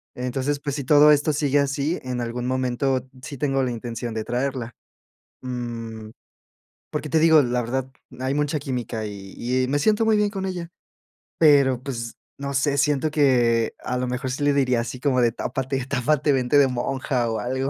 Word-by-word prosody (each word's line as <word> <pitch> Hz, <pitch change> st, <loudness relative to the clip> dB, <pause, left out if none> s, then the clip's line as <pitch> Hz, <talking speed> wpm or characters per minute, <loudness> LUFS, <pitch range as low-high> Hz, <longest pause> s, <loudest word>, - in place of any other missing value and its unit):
Entonces, 130 Hz, +3 st, -2 dB
pues, 140 Hz, -1 st, -3 dB
si 140 Hz, -, -3 dB
todo 150 Hz, +3 st, +6 dB
esto 150 Hz, +1 st, +3 dB
sigue 145 Hz, -1 st, +1 dB
así, 140 Hz, +4 st, 0 dB
en 125 Hz, -1 st, -3 dB
algún 120 Hz, +1 st, -4 dB
momento 130 Hz, 0 st, 0 dB, 0.2 s
sí, 140 Hz, -, -7 dB
tengo 135 Hz, -2 st, +1 dB
la 125 Hz, -, -1 dB
intención 120 Hz, 0 st, -5 dB
de 110 Hz, -1 st, -3 dB
traerla. 125 Hz, -1 st, -3 dB, 0.7 s
Mm, 115 Hz, -3 st, -5 dB, 0.8 s
porque 150 Hz, -, -4 dB
te 160 Hz, -, +3 dB
digo 160 Hz, -2 st, +6 dB
la 125 Hz, 0 st, 0 dB
verdad, 130 Hz, +2 st, -3 dB, 0.3 s
hay 130 Hz, +1 st, -1 dB
mucha 150 Hz, +1 st, 0 dB
química 125 Hz, -5 st, -4 dB
y 105 Hz, +5 st, -3 dB
y 125 Hz, -, -3 dB
me 145 Hz, -, +1 dB
siento 215 Hz, +7 st, +2 dB
muy 220 Hz, -, +4 dB
bien 210 Hz, -1 st, +2 dB
con 195 Hz, -2 st, -4 dB
ella, 175 Hz, -3 st, -5 dB, 0.7 s
pero, 140 Hz, -5 st, +5 dB
pues 120 Hz, -4 st, -5 dB, 0.2 s
no 140 Hz, 0 st, -4 dB
sé, 140 Hz, +1 st, +1 dB
siento 150 Hz, +1 st, +1 dB
que 120 Hz, -6 st, +2 dB
a 125 Hz, -, -4 dB
lo 125 Hz, 0 st, -1 dB
mejor 125 Hz, +1 st, -3 dB
sí 135 Hz, +3 st, -3 dB
le 145 Hz, -, +3 dB
diría 125 Hz, -4 st, +2 dB
así 120 Hz, +2 st, -6 dB
como 130 Hz, -2 st, +2 dB
de: 120 Hz, -1 st, +3 dB
"Tápate, 130 Hz, +2 st, -3 dB
tápate, 145 Hz, +2 st, +1 dB
vente 130 Hz, +1 st, +2 dB
de 140 Hz, -2 st, +6 dB
monja 125 Hz, -1 st, -1 dB
o 110 Hz, -, -2 dB
algo. 130 Hz, +2 st, -2 dB
130 Hz, 185 wpm, -23 LUFS, 125-145 Hz, 0.8 s, todo